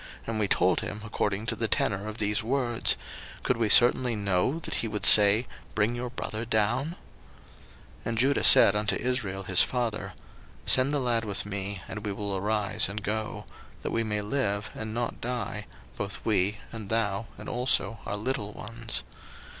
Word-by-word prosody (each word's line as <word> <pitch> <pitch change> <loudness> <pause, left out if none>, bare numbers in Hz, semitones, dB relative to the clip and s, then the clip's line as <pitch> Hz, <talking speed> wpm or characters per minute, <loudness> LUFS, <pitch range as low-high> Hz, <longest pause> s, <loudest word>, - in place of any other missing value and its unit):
and 115 -1 -3
we 105 - +1
told 90 -1 +2
him 105 - -5
according 105 -1 -2
to - - -2
the 115 - 0
tenor 100 -1 -1
of 110 0 -6
these 105 -1 0
words: 120 -1 0 0.5
could 125 - +1
we 115 -2 0
certainly 120 +2 +5
know 100 - 0
that - - -6
he 115 - -3
would 105 -1 -2
say, 105 +3 +8 0.3
Bring 110 +2 +1
your 120 +1 -4
brother 115 -2 -5
down? 115 +3 +1
01:043:008 170 - -7 1.1
And 115 -1 -2
Judah 135 +4 +2
said 100 - +8
unto 105 +1 +1
Israel 105 -7 -2
his 95 -1 +5
father, 120 -4 -2 0.5
Send 130 +2 +4
the 150 - +1
lad 120 -3 +1
with 100 -2 -3
me, 100 -1 -4
and 105 -1 -7
we 105 - -3
will 100 0 -3
arise 105 0 0
and 105 +1 -5
go; 110 +1 -3 0.4
that - - -3
we 115 - 0
may 105 -1 -2
live, 105 -3 -1
and 110 0 -5
not 120 - -3
die, 120 -4 -4 0.3
both 100 -1 -4
we, 105 -1 +1
and 110 -4 -8
thou, 110 -1 -1
and 105 - -10
also 120 -2 0
our 100 - -3
little 105 -2 -3
ones. 115 +1 -6
110 Hz, 180 wpm, -27 LUFS, 105-120 Hz, 1.1 s, say